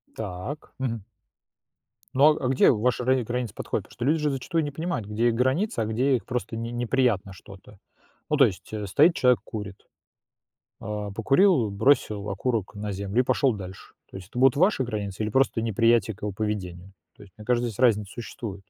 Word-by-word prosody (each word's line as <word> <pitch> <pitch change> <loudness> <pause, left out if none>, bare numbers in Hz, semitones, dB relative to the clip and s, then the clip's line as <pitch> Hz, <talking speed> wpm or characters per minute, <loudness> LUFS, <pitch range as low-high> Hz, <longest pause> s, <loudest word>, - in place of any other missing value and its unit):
Так. 110 +8 -6
Мгм. 115 -6 -3 1.1
Ну, 150 +3 +5
а 135 - -4
а - - +2
где 130 0 +4
ваши 125 +2 0
рани 130 -1 +2
границы 120 -2 -3
подходят? - - -3
Потому - - -18
что 120 - -2
люди 155 +4 +2
же 150 0 +1
зачастую 155 +5 -1
не 145 - -3
понимают, 145 - -3
где 110 +3 +1
их 115 - -1
границы, 130 - 0
а 110 - +1
где 125 +5 +1
их 120 - -4
просто 125 -2 -4
"не 115 +1 -4
неприятно 120 -5 0
что-то". 95 +1 -15 0.5
Ну, 150 - +1
то 135 - +7
есть, 90 -7 -5
э, 105 -1 -3
стоит 155 - +4
человек, 125 -1 +3
курит. 105 -4 -8 0.9
А, 105 -1 -4
покурил, 130 - +3
бросил 105 -2 +1
окурок 110 +1 -2
на 105 0 -4
землю- 100 +5 -1
и - - -9
пошел 135 -1 +2
дальше. 95 -2 -10 0.2
То - - -9
есть 95 -1 -10
это 120 - -7
будут 135 +1 +5
ваши 175 -5 +3
границы 105 -3 -4
или 105 - -2
просто 130 0 +2
неприятие 115 -1 +2
к - - -24
его 105 -1 -2
поведению? 95 -3 -4 0.2
То - - -15
есть 100 -3 -16
мне 105 - -10
кажется, 120 0 +1
здесь 110 - -9
разница 105 -5 +2
существует. 115 -3 -7
115 Hz, 200 wpm, -25 LUFS, 105-130 Hz, 1.1 s, то